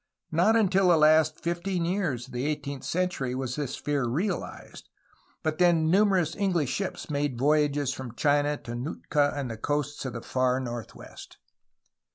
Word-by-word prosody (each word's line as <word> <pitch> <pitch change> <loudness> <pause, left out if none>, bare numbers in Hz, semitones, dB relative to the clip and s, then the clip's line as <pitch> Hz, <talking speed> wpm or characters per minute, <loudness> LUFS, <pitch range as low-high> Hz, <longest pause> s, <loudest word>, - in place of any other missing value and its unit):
Not 175 +8 +3
until 195 -4 +3
the 170 - +6
last 155 0 +4
fifteen 170 +1 -1
years 170 - -1
of 130 - -15
the 125 +3 -2
eighteenth 145 -3 -4
century 175 -8 -1
was 130 -1 -3
this 145 -3 -3
fear 145 -3 -1
realized, 175 - -4 0.5
but 155 +1 -1
then 165 -3 +4
numerous 190 -4 +3
EngUsh 180 -9 0
ships 190 -4 -4
made 145 -2 -1
the 125 - -4
voyage 145 -2 +2
from 125 -3 -8
China 145 +1 +2
to 120 -3 -8
Nootka 145 +3 0
and 135 -4 -3
the 115 - -6
coasts 145 +4 -2
of 130 - -4
the 115 - -5
far 130 0 +1
northwest. 120 -3 -8
150 Hz, 165 wpm, -27 LUFS, 130-170 Hz, 0.5 s, the